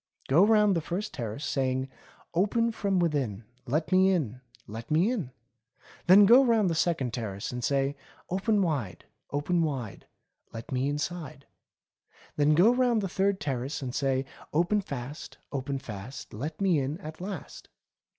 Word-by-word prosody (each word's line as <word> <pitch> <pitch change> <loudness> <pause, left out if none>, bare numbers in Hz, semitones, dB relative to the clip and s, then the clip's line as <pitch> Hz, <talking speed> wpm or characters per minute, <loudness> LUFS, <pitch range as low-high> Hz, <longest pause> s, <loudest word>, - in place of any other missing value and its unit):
Go 155 +8 +5
round 210 -2 +4
the 165 - 0
first 190 +7 -4
terrace 120 +3 -5
saying: 130 -1 0 0.5
*Open 220 +6 +2
from 200 -3 -1
within; 140 - 0 0.2
Let 155 +7 -1
me 185 +1 +5
in! 130 - -1 0.2
Let 115 +3 -8
me 170 +9 +3
in 195 - -3 0.4
!* 125 - -25
Then 195 +3 +8
go 245 +6 +8
round 225 -7 +3
the - - +1
second 155 -7 0
terrace 100 -5 -4
and 125 -1 -5
say: 140 +1 +1 0.3
'Open 200 +2 +1
wide, 120 - -2 0.2
open 160 +5 0
wide. 135 -10 -3 0.5
Let 115 0 -8
me 130 +2 0
inside.' 150 -1 -4 0.9
Then 150 +1 +3
go 200 +9 +6
round 245 -3 +2
the 195 - -1
third 195 +1 +1
terrace 135 0 -3
and 125 -2 -4
say: 135 -1 0 0.3
'Open 175 +7 +2
fast, 140 -4 -7
open 135 0 -3
fast. 120 -1 -8
Let 140 +10 -5
me 185 -6 +3
in 140 +3 -2
at 155 0 -9
last.' 190 -4 -7
150 Hz, 160 wpm, -28 LUFS, 130-190 Hz, 0.9 s, Then